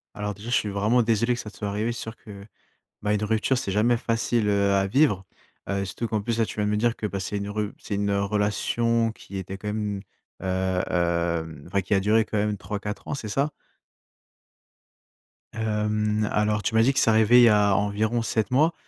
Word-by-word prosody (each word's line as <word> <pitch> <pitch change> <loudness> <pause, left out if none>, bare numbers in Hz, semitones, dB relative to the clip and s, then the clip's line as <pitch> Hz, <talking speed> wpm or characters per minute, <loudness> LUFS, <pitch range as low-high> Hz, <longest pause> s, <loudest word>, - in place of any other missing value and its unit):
Alors, 105 0 -3
déjà, 105 +4 -9
je 125 - +2
suis 105 - +1
vraiment 105 +5 +2
désolé 115 +2 +2
que - - -7
ça 105 - -6
te - - -16
soit 105 - -3
arrivé. 110 +4 -1
C'est 115 - -6
sûr 110 +1 -6
que, 100 -3 -11 0.6
bah, 105 0 0
une 105 0 0
rupture 110 +4 +1
c'est 120 -6 -2
jamais 115 +3 +3
facile, 115 -1 0
heu, 100 -1 +2
à 95 0 +2
vivre, 105 -6 +2 0.4
heu, 100 0 0
surtout 100 +5 -4
qu'en 110 -2 -1
plus, 115 +2 -2
là, 115 - +3
tu - - -7
viens 105 - +1
de 105 - 0
me 105 - +1
dire 120 +1 +1
que, 110 - -5
bah, 100 -1 -4
c'est 100 +2 -3
une 100 0 -4
rup 105 0 -3
c'est 100 - -5
une 100 0 0
relation 105 +3 +1
qui 100 -3 -9
était 95 +1 -6
quand 105 - -8
même, 105 -2 -2 0.4
heu, 95 0 0
hem 85 -3 -1
enfin 100 +2 0
qui 95 - -2
a 95 - +4
duré 110 +3 +3
quand 105 - -4
même 105 0 +1
3-4 105 +1 -6
ans, - - -1
c'est 115 -6 -6
ça? 140 +8 0 2.0
Hem, 105 -1 0
alors 105 0 +1
tu - - -1
m'as 110 - +6
dit 135 +4 +4
que - - +2
c'est - - +3
arrivé 110 +3 +6
il - - +7
y 120 - +8
a 105 -2 +4
environ 110 +4 0
7 110 -1 -1
mois. 155 +6 +3
105 Hz, 225 wpm, -25 LUFS, 100-115 Hz, 2.0 s, y